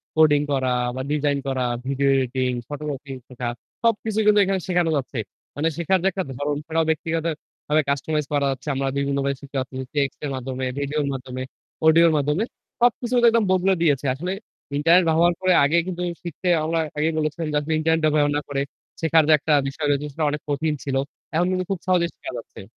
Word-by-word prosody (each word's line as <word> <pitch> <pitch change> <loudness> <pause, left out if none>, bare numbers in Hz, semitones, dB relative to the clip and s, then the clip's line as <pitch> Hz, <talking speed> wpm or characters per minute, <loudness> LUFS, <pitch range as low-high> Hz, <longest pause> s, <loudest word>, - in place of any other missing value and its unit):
Coding 150 -2 +5
করা 130 -2 +1 0.3
বা 130 - -3
design 145 -1 +1
করা 130 -2 0 0.2
ভিডিও 140 +1 +1
এডিটিং, 130 0 0 0.2
ফটোগ্রাফিং 145 -2 -5
শেখা 125 -1 -5 0.4
সবকিছুই 220 -1 +1
কিন্তু 210 0 +6
এখানে 190 -1 0
শেখানো 175 -2 +2
যাচ্ছে। 130 -3 -4 0.4
মানে 150 +3 0
শেখার 180 +2 +2
যে - - +3
একটা 190 -1 -2
ধরণও 145 +3 -2
সেটাও 160 0 0
ব্যক্তিগতভাবে 160 -1 -1
কাস্টমাইজ 150 +2 0
করা 145 -1 +2
যাচ্ছে। 135 +3 -7
আমরা 135 0 -1
বিভিন্নভাবে 140 0 0
শিখাতে 140 0 -12
পারতেছি 130 0 -4
টেক্সটের 140 0 -1
মাধ্যমে, 130 0 -4
ভিডিওর 145 +1 -1
মাধ্যমে, 130 -1 -6 0.5
অডিওর 165 0 +6
মাধ্যমে 150 +8 +1 0.4
সবকিছু 245 0 +2 0.2
একদম 230 -1 +3
বদলে 185 +1 +3
দিয়েছে। 145 -4 +2
আসলে 180 +6 -4 0.5
ইন্টারনেট 170 +4 +5
ব্যবহার 170 +2 +4
করে 185 0 +4
আগে 155 +4 +3
কিন্তু 180 -1 -4 0.2
শিখতে 170 +2 -5 0.2
আমরা 165 +1 0 0.2
আগেই 155 +2 +1
বলেছিলাম 155 +1 -2
যে 150 - +3
আসলে 160 +2 -2
ইন্টারনেট 160 0 +2
ব্যবহার 150 -1 +3
না - - -1
করে 140 -1 -1 0.4
শেখার 160 -1 +4
যে 155 - +6
একটা 150 +2 +1
বিষয় 145 +2 -3
রয়েছে 145 +1 +1
সেটা 160 0 -1
অনেক 150 0 -3
কঠিন 150 +2 0
ছিল। 135 -2 -2 0.4
এখন 175 +2 +3
কিন্তু 185 0 -1
খুব 190 - -1
সহজেই 175 -2 +2
শেখা - - -7
যাচ্ছে। 115 - -10
150 Hz, 180 wpm, -23 LUFS, 140-170 Hz, 0.5 s, কিন্তু